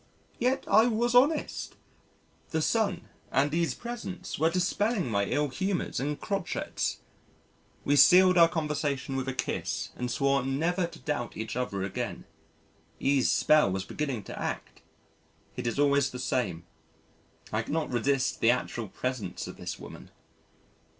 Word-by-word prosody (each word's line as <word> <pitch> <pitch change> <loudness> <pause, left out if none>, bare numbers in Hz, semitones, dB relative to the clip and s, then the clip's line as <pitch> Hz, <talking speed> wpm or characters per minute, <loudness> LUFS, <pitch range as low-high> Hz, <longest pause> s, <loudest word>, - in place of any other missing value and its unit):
Yet 255 +3 +1
I 220 +2 +6
was 240 +1 +1
honest: 285 +5 +2 0.7
the 160 -1 0
Sun 205 -5 +1 0.3
and 140 +3 +2
E.'s 170 0 +1
presence 235 -11 -6
were 160 +2 +4
dispelling 185 - 0
my 100 -1 +1
ill 145 +7 0
humours 190 +7 -2
and 145 +2 -2
crochets. 200 -3 -2 0.8
We 145 - +3
sealed 185 +4 +7
our 170 -2 +8
conversation 145 -4 -2
with 135 0 -2
a 135 - -1
kiss 125 - -2
and 125 0 -3
swore 140 +1 +2
never 165 +8 0
to - - -12
doubt 135 -6 -3
each 110 +1 -4
other 110 -6 -2
again. 95 - -4 0.7
E.'s 135 -1 +2
spell 155 -7 +4
was 95 0 -2
beginning 135 -8 -3
to - - -8
act. - - -5 0.7
It 125 -1 -3
is 115 - -2
always 140 -2 +3
the 125 - -7
same. 100 -11 -1 0.9
I 110 - +1
cannot 155 +6 -2
resist 135 +2 +1
the 115 - +5
actual 120 -2 0
presence 110 -3 -4
of - - -9
this - - -5
woman. - - -11
145 Hz, 145 wpm, -29 LUFS, 125-180 Hz, 0.9 s, our